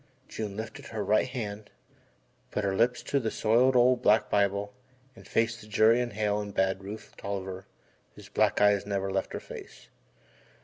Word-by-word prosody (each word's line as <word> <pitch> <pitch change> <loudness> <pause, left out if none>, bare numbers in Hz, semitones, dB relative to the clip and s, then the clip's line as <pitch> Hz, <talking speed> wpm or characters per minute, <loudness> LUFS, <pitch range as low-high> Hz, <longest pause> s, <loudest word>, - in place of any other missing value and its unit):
June 105 -2 -5
lifted 110 +1 -7
her 110 -2 -4
right 110 +4 +3
hand, 110 -5 -5 0.8
put 105 - -2
her 100 -1 0
lips 120 +4 +2
to 140 - 0
the 115 -4 -1
soiled, 120 +5 +3
old, 125 0 +4
black 110 -2 +3
Bible 100 0 +1 0.4
and - - -15
faced 115 +1 0
the 105 - -13
jury 110 +3 +4
and 120 -2 -3
Hale 105 0 0
and 100 -1 -7
Bad 95 0 +1
Rufe 105 +3 -9
Tolliver 95 -1 -5 0.5
whose - - -12
black - - +1
eyes 105 -1 +4
never 100 -1 -2
left 95 0 -2
her - - -3
face. - - -11
105 Hz, 175 wpm, -28 LUFS, 100-115 Hz, 0.8 s, old